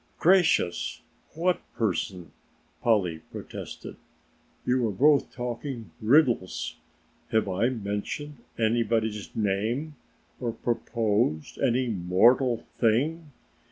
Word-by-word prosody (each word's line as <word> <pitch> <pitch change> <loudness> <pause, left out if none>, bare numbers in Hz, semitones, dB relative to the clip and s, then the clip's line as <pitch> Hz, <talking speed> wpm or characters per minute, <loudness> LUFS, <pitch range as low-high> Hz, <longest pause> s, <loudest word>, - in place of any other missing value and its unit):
"Gracious, 175 - +3 0.3
what 175 +2 +1
person?" 90 -5 -2 0.5
Polly 95 -8 +2
protested. - - -8 0.7
"You 125 -1 +2
are - - -1
both 145 +7 +3
talking 120 - -5
riddles. 120 -5 +2 0.5
Have 110 -2 +2
I 100 +6 +1
mentioned 120 +6 -4 0.2
anybody's 110 -2 0
name 110 +9 -1 0.4
or 120 -3 -2
proposed 110 -8 -1
any 130 -1 +2
mortal 115 +6 +3
thing? 145 +8 +1
115 Hz, 85 wpm, -27 LUFS, 105-130 Hz, 0.7 s, Gracious